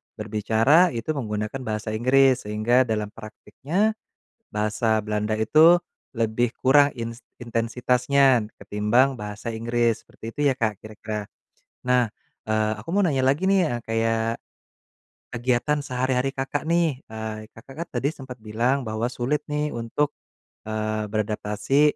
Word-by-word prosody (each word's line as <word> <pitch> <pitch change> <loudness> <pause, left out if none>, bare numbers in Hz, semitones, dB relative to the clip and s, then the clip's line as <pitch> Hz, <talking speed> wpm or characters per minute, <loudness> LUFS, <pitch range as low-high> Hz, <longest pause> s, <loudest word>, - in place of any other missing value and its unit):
berbicara 110 - +3
itu 115 +7 -2
menggunakan 110 -2 -3
bahasa 110 0 -3
Inggris, 130 +2 +3
sehingga 115 +4 +2
dalam 105 -2 -2
praktiknya 155 - -2 0.6
bahasa 110 +1 0
Belanda 105 +1 -1
itu 155 +10 +6 0.4
lebih 115 +1 +1
kurang 145 +2 +5
ins 115 +1 -5 0.2
intensitasnya 125 +1 +2
ketimbang 110 +6 +2
bahasa 105 0 -6
Inggris, 115 0 0
seperti - - -15
itu - - -12
ya, - - +2
Kak, 110 -4 -1
kira-kira. 110 -1 -6 0.6
Nah, 125 -3 +3 0.3
eee, 110 0 +1
aku - - -11
mau 200 - +2
nanya 135 -4 +1
lagi 140 +8 +2
nih, 195 -1 +4
eee, 120 -1 -3
kayak 115 0 +1 1.0
kegiatan 125 +5 0
sehari-hari 130 +1 0
Kakak 135 +2 -3
nih, 165 -5 +1
eee, 110 -1 -6
Kakak 130 +4 -14
kan - - -40
tadi 140 - +1
sempet 130 -6 -10
bilang 120 +6 0
bahwa 110 0 -2
sulit 140 +5 -1
nih 150 0 -1
untuk, 140 +6 -1 0.5
eee, 110 0 -2
beradaptasi, 105 +5 0
115 Hz, 130 wpm, -24 LUFS, 110-135 Hz, 1.0 s, itu